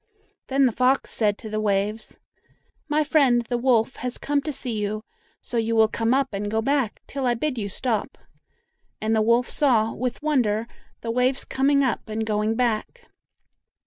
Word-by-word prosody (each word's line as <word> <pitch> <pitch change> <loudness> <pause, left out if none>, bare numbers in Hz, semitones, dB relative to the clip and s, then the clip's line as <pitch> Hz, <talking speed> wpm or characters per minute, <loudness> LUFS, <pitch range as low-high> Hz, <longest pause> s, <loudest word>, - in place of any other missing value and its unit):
Then 270 0 +3
the 250 - +3
fox 255 +4 +1
said 210 -2 +1
to - - -9
the 215 - -1
waves, 210 +1 -1 0.7
"My 305 +1 +2
friend, 270 -6 +3
the 245 - 0
wolf, 245 -1 +2
has 250 0 -4
come 290 0 0
to 305 - -3
see 260 -3 -5
you, 215 0 -2 0.4
so 240 - -4
you 230 0 0
will 220 -1 +5
come 225 +1 -1
up 270 -2 +1
and 205 +1 -3
go 220 +1 0
back 265 -1 0
till 270 -2 -3
I 240 - +2
bid 255 0 -2
you 200 -2 -3
stop;" 220 +1 -2 0.8
and 220 +1 0
the 220 - +3
wolf 235 +3 +3
saw, 230 -6 +2
with 250 +2 -4
wonder, 230 -8 +1 0.4
the 230 - -3
waves 250 +2 +1
coming 280 +1 +2
up 245 -4 -2
and 220 +1 -2
going 215 +1 0
back. 245 - -2
235 Hz, 180 wpm, -24 LUFS, 220-265 Hz, 0.8 s, will